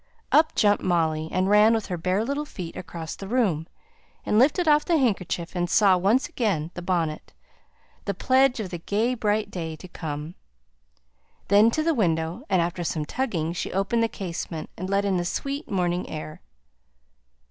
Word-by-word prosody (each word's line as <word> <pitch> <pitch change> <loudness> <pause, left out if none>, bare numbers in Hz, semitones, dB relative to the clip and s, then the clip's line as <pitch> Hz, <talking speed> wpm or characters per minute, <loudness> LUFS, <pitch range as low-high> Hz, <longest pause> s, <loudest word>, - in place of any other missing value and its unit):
Up 315 +1 +4
jumped 205 -1 +3
Molly, 160 -3 0
and 185 +1 +1
ran 210 +3 +5
with 220 - -2
her 180 - -3
bare 185 +5 0
little 280 +5 -2
feet 180 - -8
across 170 -3 -6
the 195 - -8
room, 195 -9 +1 0.6
and 210 - +3
lifted 310 +7 +3
off 300 0 +5
the 340 -2 +2
handkerchief 190 - -1
and 175 -1 -1
saw 200 -3 +5
once 200 +8 +2
again 175 -9 -1
the 175 - -6
bonnet; 170 -4 -2 0.7
the 200 - -2
pledge 260 +4 +3
of 195 -4 -4
the 175 - -5
gay 215 +8 0
bright 215 -3 0
day 165 -3 -4
to 185 - -11
come. 155 -1 -6 1.2
Then 205 +3 +6
to 310 +7 -1
the 330 +1 +2
window, 170 - 0
and 185 -4 +3
after 175 +1 -3
some 160 -2 -2
tugging 170 - -2
she 175 - -4
opened 195 +5 0
the 230 - +3
casement, 170 -6 -6
and 185 +1 -5
let 200 +1 +1
in 195 -2 +1
the 175 - 0
sweet 275 - -4
morning 180 -2 -1
air. 155 +2 -7
190 Hz, 180 wpm, -25 LUFS, 170-225 Hz, 1.2 s, Then